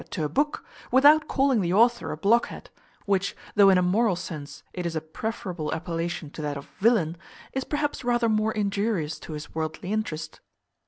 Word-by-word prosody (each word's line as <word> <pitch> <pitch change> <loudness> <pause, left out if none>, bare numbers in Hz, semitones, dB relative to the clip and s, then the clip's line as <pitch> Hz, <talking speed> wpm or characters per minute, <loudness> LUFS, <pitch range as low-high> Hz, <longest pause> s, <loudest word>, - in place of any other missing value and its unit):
to 165 - -3
a - - -2
book, 295 - 0 0.3
without 295 +4 +6
calling 270 -5 +2
the 175 -2 0
author 235 +5 +3
a - - -4
blockhead; 230 +4 +1 0.3
which, 195 -1 0 0.2
though 200 -1 +7
in 190 - +6
a 180 - +3
moral 200 +2 +2
sense 155 -5 -7
it 180 - -4
is 170 -1 -3
a - - +1
preferable 170 -1 -4
appellation 165 -1 -4
to 155 - -7
that 145 -1 -3
of 140 - -8
villain, 195 -7 +3 0.4
is 265 - -1
perhaps 290 -1 -2
rather 240 -1 +2
more 215 0 +2
injurious 200 -6 -1
to 160 - -8
his 150 0 -8
worldly 160 +4 -4
interest. 165 -8 -3
195 Hz, 180 wpm, -26 LUFS, 160-230 Hz, 0.4 s, though